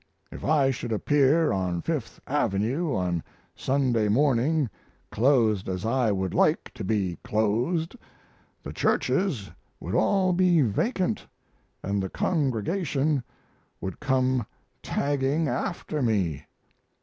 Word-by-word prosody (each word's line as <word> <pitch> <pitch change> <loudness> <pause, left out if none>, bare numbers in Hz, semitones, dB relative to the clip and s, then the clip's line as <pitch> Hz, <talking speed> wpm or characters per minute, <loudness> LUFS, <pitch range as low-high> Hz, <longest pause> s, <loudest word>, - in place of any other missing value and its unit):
If - - -9
I 140 -3 +3
should 125 -2 -5
appear 145 +6 +3
on 90 -3 -1
Fifth 145 -9 -3
Avenue 130 - 0
on 90 -2 0
a 80 - -6 0.3
Sunday 130 -5 +1
morning 140 +5 +2 0.4
clothed 110 -6 +2
as 90 +2 -3
I 120 -1 +2
would 95 -2 -1
like - - +2
to - - -7
be 95 -4 -1
clothed 120 - 0 0.7
the - - -7
churches 175 - 0 0.3
would 90 - -5
all 185 - +3
be 175 -3 +4
vacant 180 - -1 0.6
and 100 +1 -1
the 95 - -3
congregation 145 - 0 0.6
would 95 - -5
come 130 -4 +1 0.3
tagging 145 +2 0
after 155 -2 -2
me. 95 - 0
130 Hz, 115 wpm, -26 LUFS, 105-150 Hz, 0.7 s, be